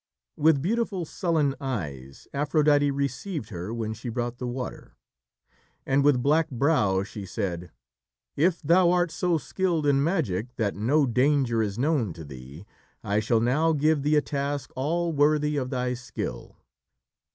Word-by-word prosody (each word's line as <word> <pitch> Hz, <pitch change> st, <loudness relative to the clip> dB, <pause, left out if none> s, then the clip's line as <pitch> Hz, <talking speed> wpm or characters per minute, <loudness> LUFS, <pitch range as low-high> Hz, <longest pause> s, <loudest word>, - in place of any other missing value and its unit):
With 150 Hz, -2 st, +3 dB
beautiful, 200 Hz, -2 st, -1 dB
sullen 155 Hz, -4 st, 0 dB
eyes, 75 Hz, -, -5 dB
Aphrodite 145 Hz, 0 st, +3 dB
received 140 Hz, -, -3 dB
her 90 Hz, 0 st, -6 dB
when 110 Hz, -2 st, -3 dB
she 115 Hz, +3 st, -7 dB
brought 120 Hz, +1 st, -3 dB
the 125 Hz, -, -3 dB
water. 125 Hz, +1 st, -6 dB, 0.9 s
And, 135 Hz, +1 st, +2 dB
with 135 Hz, -4 st, +3 dB
black 155 Hz, +3 st, +3 dB
brow, 115 Hz, -8 st, +2 dB
she 100 Hz, 0 st, -8 dB
said: 90 Hz, -4 st, -4 dB, 0.7 s
"If 170 Hz, +3 st, +1 dB
thou 170 Hz, +4 st, +5 dB
art 175 Hz, -1 st, +2 dB
so 175 Hz, -1 st, +1 dB
skilled 170 Hz, 0 st, -1 dB
in 140 Hz, -1 st, +3 dB
magic 125 Hz, -, -1 dB
that 105 Hz, -4 st, 0 dB
no 140 Hz, +8 st, +2 dB
danger 125 Hz, -1 st, +2 dB
is 105 Hz, -1 st, -2 dB
known 130 Hz, -, +1 dB
to 80 Hz, -, -9 dB
thee, 70 Hz, +5 st, -11 dB, 0.4 s
I 105 Hz, -1 st, +1 dB
shall 110 Hz, +1 st, +1 dB
now 150 Hz, +8 st, +2 dB
give 155 Hz, 0 st, +2 dB
thee 150 Hz, +2 st, +2 dB
a 150 Hz, -, +4 dB
task 140 Hz, -2 st, -3 dB
all 165 Hz, +5 st, -1 dB
worthy 150 Hz, 0 st, +2 dB
of 130 Hz, -3 st, -2 dB
thy 125 Hz, -1 st, -1 dB
skill." 125 Hz, 0 st, -6 dB
140 Hz, 150 wpm, -26 LUFS, 115-155 Hz, 0.9 s, thou